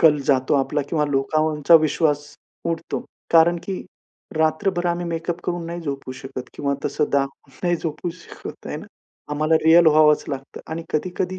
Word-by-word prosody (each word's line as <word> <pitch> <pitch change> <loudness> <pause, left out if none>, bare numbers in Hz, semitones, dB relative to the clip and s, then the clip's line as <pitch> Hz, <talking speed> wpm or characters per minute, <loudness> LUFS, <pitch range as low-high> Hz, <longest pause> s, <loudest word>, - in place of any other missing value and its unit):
कल 155 -3 +6
जातो 130 0 +3
आपला 140 +1 +1
किंवा 155 -3 +1
लोकांवरचा 150 +3 +2
विश्वास 150 -2 +3 0.3
उडतो. 165 0 -3 0.3
कारण 170 +1 +6
की 190 -2 -4 0.5
रात्रभर 175 +3 +1
आम्ही 175 0 -1
मेकअप 170 +1 -3
करून 175 -1 -2
नाही 170 +1 -5
झोपू 140 -4 -5
शकत 130 -1 -8
किंवा 140 -1 -1
तसं 150 +2 0
दाखून 140 0 -1
नाही 175 -1 +2
झोपू 165 +1 -4
शकत 180 - -10
आहे - - -4
ना. - - -9 0.5
आम्हाला 155 +2 +2
रिअल 165 +1 +7
व्हावंच 155 -1 +5
लागतं 135 -1 -6
आणि 165 +1 -3
कधी-कधी 180 +3 -1
155 Hz, 160 wpm, -22 LUFS, 145-170 Hz, 0.5 s, रिअल